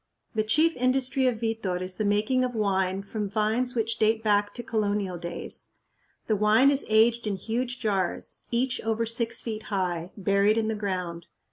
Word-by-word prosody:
The 220 - +1
chief 310 +10 +3
industry 255 +1 +2
of 235 -3 0
Vitor 225 -6 -1
is 185 0 -4
the 215 - -1
making 215 +5 +2
of 250 -1 -2
wine 190 -2 0
from 205 0 -4
vines 220 +5 0
which 225 -1 -1
date 220 +1 +2
back 205 -1 +2
to 240 - -4
colonial 205 -5 -1
days. 175 0 -5 0.6
The 215 - +1
wine 215 +7 +5
is 280 0 +1
aged 225 +1 +3
in 205 - 0
huge 245 +5 -3
jars, 195 -5 -2
each 255 +2 0
over 225 +1 0
six 230 0 0
feet 220 -2 -4
high, 180 -3 -2
buried 200 +2 +2
in 220 -1 +1
the - - 0
ground. 180 -5 -4
215 Hz, 175 wpm, -27 LUFS, 200-235 Hz, 0.6 s, wine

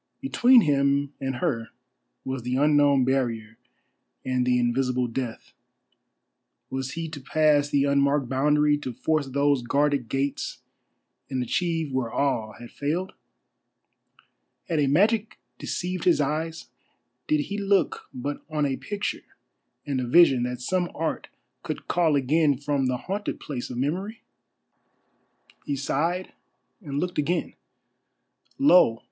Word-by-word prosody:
Between 255 -2 +5
him 140 -2 +1
and 135 -1 -2
her 120 -6 -2 0.6
was 130 -1 -3
the 125 +2 -2
unknown 145 -2 +4
barrier 115 -4 -1 0.7
and 125 -1 0
the 125 0 +3
invisible 125 +1 +1
Death. 120 -1 -5 1.2
Was 130 0 -3
he 165 0 -4
to 150 -3 -8
pass 145 +1 +2
the 140 -1 +2
unmarked 140 -1 +2
boundary, 150 +3 +2
to 130 -4 -5
force 150 +4 0
those 140 0 +1
guarded 140 0 0
gates 135 +1 -2 0.7
and 130 -2 -1
achieve 165 +3 -1
where 130 -3 -1
all 115 -6 -1
had 120 0 -12
failed? 165 +6 -3 1.5
Had 165 -3 0
a 145 - +2
magic 210 - +2 0.2
deceived 180 -1 -3
his 175 -4 +4
eyes? 155 +3 -2 0.6
Did 150 -1 +2
he 200 +8 -4
look 200 -1 0
but 140 +3 -5
on 150 -2 0
a 135 -2 -1
picture 205 -1 -5 0.5
and 140 -3 -1
a 125 - -3
vision 145 -3 +6
that 125 0 -4
some 175 +6 0
art 160 0 -3 0.3
could - - -6
call 165 -4 +2
again 145 +1 +2
from 140 -1 -1
the 125 0 0
haunted 200 +9 -4
place 130 -5 -5
of 125 - -6
Memory? 185 - -3 1.4
He 145 - 0
sighed 165 +7 -1 0.5
and 140 -6 -5
looked 180 +1 -2
again. 165 +5 -1 1.0
Lo! 180 - +5
145 Hz, 130 wpm, -25 LUFS, 130-160 Hz, 1.5 s, vision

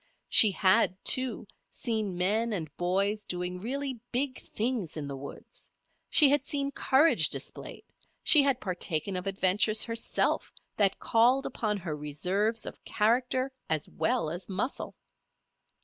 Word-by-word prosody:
She 215 - +8
had, 185 -1 +2
too, 255 -1 +2 0.2
seen 215 -7 -3
men 215 +5 +1
and 160 -7 -5
boys 200 +4 -1
doing 180 0 -4
really 265 +4 -4
big 260 +1 -2
things 220 -8 -3
in 145 -2 -5
the 140 - -6
woods; 135 +1 -11 0.4
she 300 - +7
had 285 -1 +2
seen 280 -1 -2
courage 280 +4 +4
displayed; - - -5 0.4
she 300 - +7
had 275 -3 +1
partaken 180 -4 -2
of 180 +1 -4
adventures 195 +3 +2
herself 230 0 -1 0.2
that 200 -2 +2
called 245 +4 +2
upon 210 -2 -2
her 170 -5 -5
reserves 185 +10 -1
of - - -9
character, 250 +4 0 0.2
as 155 -2 -1
well 155 -1 -1
as 175 +3 -6
muscle. 200 +8 -4
210 Hz, 135 wpm, -28 LUFS, 180-250 Hz, 0.4 s, She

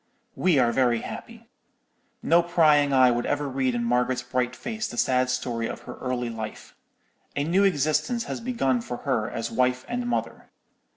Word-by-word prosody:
"We 180 -5 +2
are 120 -3 +4
very 120 -2 +2
happy. 230 0 -9 0.8
No 170 +1 +5
prying 155 -4 +3
eye 130 -2 +5
would 120 0 -1
ever 145 0 -1
read 130 -2 -1
in 120 - -1
Margaret's 125 +1 +1
bright 125 0 -1
face 220 -2 -4
the 120 - -8
sad 130 0 +2
story 125 -3 -2
of - - -6
her - - -8
early 125 -2 -2
life. 110 -1 -7 0.6
A 145 - 0
new 180 +6 +2
existence 190 - +1
has - - -5
begun 135 - 0
for 120 +1 -5
her 120 -6 0
as 115 +1 -4
wife 125 +2 +1
and 245 0 -3
mother. 245 - -3
130 Hz, 175 wpm, -25 LUFS, 120-165 Hz, 0.8 s, No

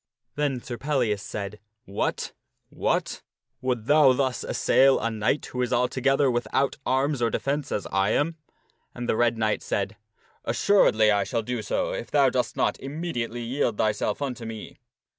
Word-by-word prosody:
Then 140 -4 -1
Sir 120 -2 -6
Pellias 120 -8 0
said, 105 0 -6 0.2
" 115 +3 -54
What! - - -1 0.4
what! - - -1 0.4
Wouldst 125 -4 -1
thou 145 -1 +6
thus 130 -1 -1
assail 135 0 +3
a 115 - -1
knight 110 +6 0
who 125 - -4
is 125 - -1
altogether 135 +2 +2
without 120 +4 0
arms 135 +1 +1
or 115 - +3
defence 140 +4 -2
as 105 - -2
I 95 +1 +2
am?" 155 +8 +1 0.6
And 120 0 -5
the - - +2
Red 120 0 +2
Knight 110 -1 0
said, 100 +1 -2 0.2
" - - -35
Assuredly 110 - +4 0.2
shall 115 -3 -1
I - - -13
do 125 0 -3
so - - -1
if - - -5
thou - - +4
dost - - -1
not - - +1
immediately 135 -6 -4
yield 120 -2 -1
thyself 105 +4 0
unto 125 -4 -4
me." 110 -1 -8
125 Hz, 170 wpm, -26 LUFS, 110-135 Hz, 0.6 s, thou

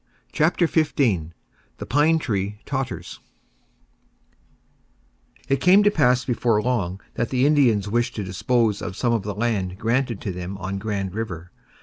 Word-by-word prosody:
CHAPTER 170 +3 +2
XV 160 -2 +1 0.8
THE - - -6
PINE 150 +4 +3
TREE 105 -8 -2
TOTTERS 135 -2 -4 2.3
It 135 0 0
came 190 +3 +6
to 205 - +4
pass 125 -7 +2
before 120 -3 +1
long 105 -6 -1
that 115 - -2
the 130 0 +2
Indians 125 -9 +3
wished 120 +3 0
to 105 - -3
dispose 105 +3 0
of 90 - -5
some 120 -2 +1
of 115 - +1
the 100 0 -5
land 100 -5 -1
granted 115 0 0
to 100 - -3
them 90 +2 -6
on 95 +1 -4
Grand 100 -3 -3
River. 90 -6 -5
115 Hz, 145 wpm, -23 LUFS, 100-130 Hz, 2.3 s, came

